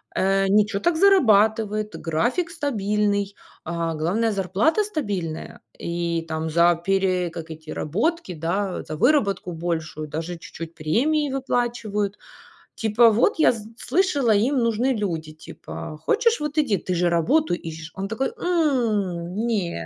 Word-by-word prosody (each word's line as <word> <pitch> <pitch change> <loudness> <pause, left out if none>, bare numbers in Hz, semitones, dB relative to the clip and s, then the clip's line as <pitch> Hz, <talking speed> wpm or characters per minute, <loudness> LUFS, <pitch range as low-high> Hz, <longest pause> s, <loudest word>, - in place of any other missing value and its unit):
э, 195 +1 +2
ничё 205 +1 +3
так 345 +7 +1
зарабатывает, 220 - +3
график 240 - -1
стабильный, 210 - -1 0.3
а 170 0 -2
главное- 185 +9 0
зарплата 200 - +1
стабильная, 205 - -4 0.2
и 170 -1 -2
там 160 0 -3
за 170 +2 +4
пере 185 -2 +1
как 165 -1 -8
эти 155 0 -10
работки, 225 - -1
да, 180 +4 -2
за 155 - -6
выработку 205 - +2
большую 160 -2 -3
даже 165 +4 -5
чуть-чуть 165 0 -9
премии 280 - +1
выплачивают". 235 -6 -1 0.6
Типа: 225 +1 +4
"Вот 240 - +2
я - - +6
с 225 -3 -7
слышала, 295 - +1
им 240 +8 +2
нужны 235 +3 +1
люди, 165 -8 -3
типа, 155 0 -9
хочешь- 465 - +2
вот 300 +1 -3
иди, 255 -10 +2
ты 185 - -3
же 175 0 +2
работу 245 - +2
ищешь". 160 -1 -8
Он 195 0 -4
такой: 225 +6 -1
"М, 220 - 0
не, 180 - -2
200 Hz, 135 wpm, -23 LUFS, 170-245 Hz, 0.6 s, я